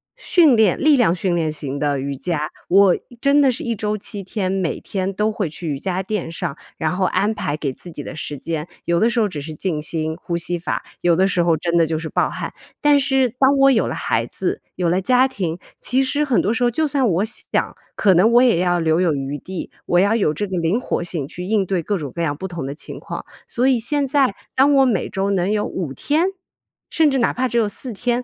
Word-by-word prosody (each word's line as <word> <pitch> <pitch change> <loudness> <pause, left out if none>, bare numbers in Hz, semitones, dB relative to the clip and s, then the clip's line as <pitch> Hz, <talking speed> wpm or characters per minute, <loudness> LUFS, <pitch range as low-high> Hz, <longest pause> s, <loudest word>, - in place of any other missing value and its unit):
训 320 -8 +4
练 220 -5 +3
力 305 -1 +5
量 235 -10 +3
训 180 0 -1
练 160 -2 0
型 145 -2 -5
的 145 -2 0
瑜 140 +1 -3
伽， 150 +2 -2 0.2
我 195 0 +6
一 240 - -13
真 280 +3 +4
的 270 -2 +4
是 240 - -5
1 235 -1 -1
周 210 0 -2
7 205 0 -5
天， 190 0 -3
每 190 -3 -1
天 195 0 -3
都 210 +3 0
会 205 -7 -2
去 165 +2 -7
瑜 140 -3 -2
伽 185 +3 -2
垫 190 -4 -3
上， 165 -4 -4 0.2
然 160 +2 -1
后 185 0 +1
安 205 +3 +1
排 150 -8 -3
给 140 -4 -3
自 175 - -12
己 145 - -7
的 - - -7
时 150 -2 -5
间。 160 +2 -4 0.2
有 170 0 +2
的 230 - +3
时 235 - 0
候 215 - +3
只 160 -7 -6
是 155 +2 -7
静 155 -2 -2
心 160 0 -3
呼 170 0 -4
吸 175 +1 -1
法， 165 - -3 0.2
有 175 -1 +3
的 185 +3 +3
时 180 -2 +1
候 170 -1 +2
真 170 +2 -1
的 165 - +5
就 160 - -1
是 160 0 -5
爆 - - +1
汗。 - - -5 0.3
但 290 -1 +4
是 265 -2 +2
当 275 +1 +4
我 275 0 +6
有 230 - +2
了 - - -3
孩 - - 0
子、 - - -3
有 180 -2 0
了 180 +3 +1
家 255 +5 +4
庭， 180 -11 -3 0.2
其 260 +2 +2
实 285 +3 0
很 270 -5 +2
多 210 - 0
时 235 - 0
候 240 - +4
就 310 +6 0
算 270 -4 +1
我 185 +3 +1
想， 225 - -2 0.2
可 195 -3 +4
能 185 +6 +4
我 240 - +7
也 235 -9 +4
要 175 -1 +2
留 160 +1 +2
有 175 -4 +2
余 140 +1 -4
地， 185 +3 -7 0.2
我 175 - +3
要 200 +4 +3
有 200 -9 +2
这 205 +7 -3
个 190 -1 -3
灵 170 +7 +1
活 255 - -2
性 165 -5 -3
去 180 - -7
应 200 +1 +1
对 185 -1 -1
各 205 +5 -1
种 145 -6 -6
各 170 - -2
样 145 -3 -1
不 190 - -5
同 170 -6 -5
的 140 - -5
情 - - -8
况。 - - -7 0.2
所 245 +2 +1
以 260 -3 +3
现 280 +4 +1
在 265 -6 +2 0.2
当 280 +2 +4
我 270 -1 +5
每 225 -8 0
周 195 +1 -1
能 190 0 +1
有 210 -1 0
5 170 -7 -4
天， 300 - +1 0.6
甚 315 -2 +4
至 270 - 0
哪 235 - +2
怕 255 +1 0
只 240 - -2
有 225 -2 +3
4 240 +5 -6
天 240 +3 -1
190 Hz, 270 characters per minute, -20 LUFS, 165-240 Hz, 0.6 s, 我